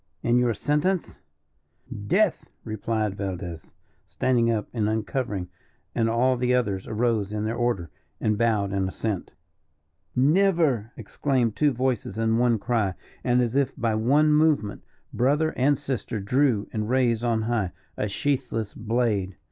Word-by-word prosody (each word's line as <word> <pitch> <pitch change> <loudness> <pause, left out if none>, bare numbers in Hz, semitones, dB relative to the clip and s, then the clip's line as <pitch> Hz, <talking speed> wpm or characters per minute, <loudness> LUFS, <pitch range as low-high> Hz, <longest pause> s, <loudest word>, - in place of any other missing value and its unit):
"And 120 +1 +3
your 120 -2 +2
sentence?" 150 - 0 0.9
"Death!" 200 - +2
replied 110 -1 -2
Valdez, 90 -5 -6 0.3
standing 115 +8 +1
up 110 -2 0
and 110 -3 0
uncovering, 110 -3 -2 0.5
and 115 -1 +1
all 125 +3 +2
the 125 +1 +2
others 100 -6 -1
arose 110 -3 0
in 105 0 -2
their 110 +2 -1
order, 120 -9 -1 0.3
and 110 - +1
bowed 105 -3 +1
in 95 -1 0
assent. 100 0 -3 0.8
"Never!" 150 - +3
exclaimed 120 0 -1
two 150 +3 +3
voices 125 -5 -1
in 115 0 +2
one 120 -2 +3
cry, 110 -4 0 0.3
and, 125 0 +3
as 120 +1 -2
if 140 -1 +1
by 115 -1 0
one 140 +8 +3
movement, 150 -9 +2 0.3
brother 145 +6 +2
and 140 +2 +3
sister 130 -5 -3
drew, 120 +1 +1
and 105 0 -2
raised 120 -3 +2
on 115 -2 +1
high, 110 -5 0 0.2
a 105 - -1
sheathless 115 -2 -2
blade. 110 -4 -1
115 Hz, 140 wpm, -25 LUFS, 105-130 Hz, 0.9 s, And